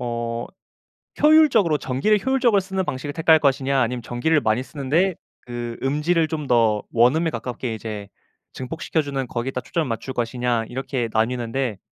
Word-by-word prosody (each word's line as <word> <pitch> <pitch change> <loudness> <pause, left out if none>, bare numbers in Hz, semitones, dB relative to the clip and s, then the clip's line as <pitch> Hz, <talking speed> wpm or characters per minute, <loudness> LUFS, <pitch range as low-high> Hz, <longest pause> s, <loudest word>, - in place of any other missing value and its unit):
어 120 -1 -3 0.8
효율적으로 290 - +5
전기를 190 +13 +1
효율적으로 250 -6 +3
쓰는 190 0 -3
방식을 140 +1 -4
택할 160 0 +4
것이냐 135 -2 +1
아니면 120 0 -1
전기를 125 +7 +1
많이 110 0 +1
쓰는데 155 +8 0 0.3
그 120 -1 -6
음질을 150 +5 +1
좀 155 -3 -4
더 115 -4 +3
원음에 130 +9 +3
가깝게 125 -4 -4
이제 105 -2 -6 0.4
증폭시켜 155 +4 -2
주는 140 -2 -3
거기에다 125 +2 -3
초점을 160 +1 -2
맞출 120 +3 -4
것이냐 120 -1 -1
이렇게 130 -2 -3
나뉘는데. 120 0 -1
130 Hz, 375 characters per minute, -22 LUFS, 120-160 Hz, 0.8 s, 효율적으로